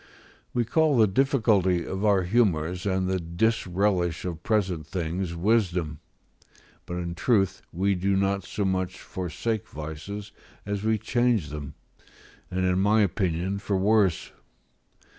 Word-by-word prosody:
We 120 Hz, -1 st, 0 dB
call 155 Hz, +3 st, +3 dB
the 110 Hz, -, +6 dB
difficulty 105 Hz, -6 st, +2 dB
of 95 Hz, +2 st, -4 dB
our 100 Hz, -3 st, +4 dB
humours 90 Hz, -3 st, +1 dB
and 95 Hz, -1 st, 0 dB
the 95 Hz, 0 st, 0 dB
disrelish 90 Hz, -1 st, 0 dB
of 85 Hz, -3 st, -4 dB
present 90 Hz, -7 st, 0 dB
things 85 Hz, 0 st, -3 dB
wisdom; 90 Hz, -6 st, +1 dB, 0.9 s
but, 90 Hz, -, -4 dB
in 85 Hz, -1 st, -3 dB
truth, 95 Hz, +1 st, +1 dB
we 100 Hz, +3 st, +1 dB
do 95 Hz, +1 st, 0 dB
not 100 Hz, 0 st, +1 dB
so 100 Hz, +3 st, -3 dB
much 95 Hz, -1 st, -1 dB
forsake 95 Hz, +5 st, -3 dB
vices 80 Hz, +7 st, -7 dB, 0.3 s
as 100 Hz, 0 st, -3 dB
we 110 Hz, 0 st, +2 dB
change 115 Hz, -4 st, +1 dB
them, 75 Hz, -1 st, -7 dB, 0.7 s
and 95 Hz, +1 st, -1 dB
in 90 Hz, 0 st, +2 dB
my 105 Hz, +3 st, +4 dB
opinion, 95 Hz, 0 st, -1 dB
for 100 Hz, 0 st, -1 dB
worse. 100 Hz, -3 st, +2 dB
95 Hz, 135 wpm, -26 LUFS, 85-105 Hz, 0.9 s, the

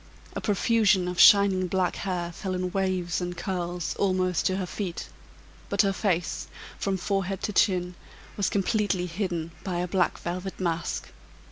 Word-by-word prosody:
A -, -, -3 dB
profusion 205 Hz, -3 st, +3 dB
of 180 Hz, -1 st, -3 dB
shining 195 Hz, -2 st, +7 dB
black 185 Hz, 0 st, 0 dB
hair 180 Hz, -3 st, -2 dB
fell 185 Hz, +2 st, -4 dB
in 180 Hz, 0 st, -2 dB
waves 185 Hz, -3 st, -1 dB
and 175 Hz, 0 st, -4 dB
curls 175 Hz, -3 st, -3 dB
almost 185 Hz, -3 st, +1 dB
to 185 Hz, -, 0 dB
her 190 Hz, -, -2 dB
feet; 180 Hz, -2 st, -5 dB, 0.6 s
but 200 Hz, +1 st, +3 dB
her 195 Hz, -1 st, +1 dB
face, 180 Hz, -4 st, -1 dB, 0.3 s
from 195 Hz, -1 st, 0 dB
forehead 195 Hz, 0 st, -2 dB
to 210 Hz, -, -2 dB
chin, 180 Hz, -3 st, +2 dB, 0.4 s
was 200 Hz, -, +1 dB
completely 200 Hz, -2 st, 0 dB
hidden 170 Hz, -2 st, -3 dB
by 180 Hz, -3 st, -2 dB
a 180 Hz, +1 st, -1 dB
black 180 Hz, 0 st, +1 dB
velvet 180 Hz, +2 st, -5 dB
mask. 170 Hz, -2 st, -2 dB
185 Hz, 155 wpm, -27 LUFS, 175-195 Hz, 0.6 s, shining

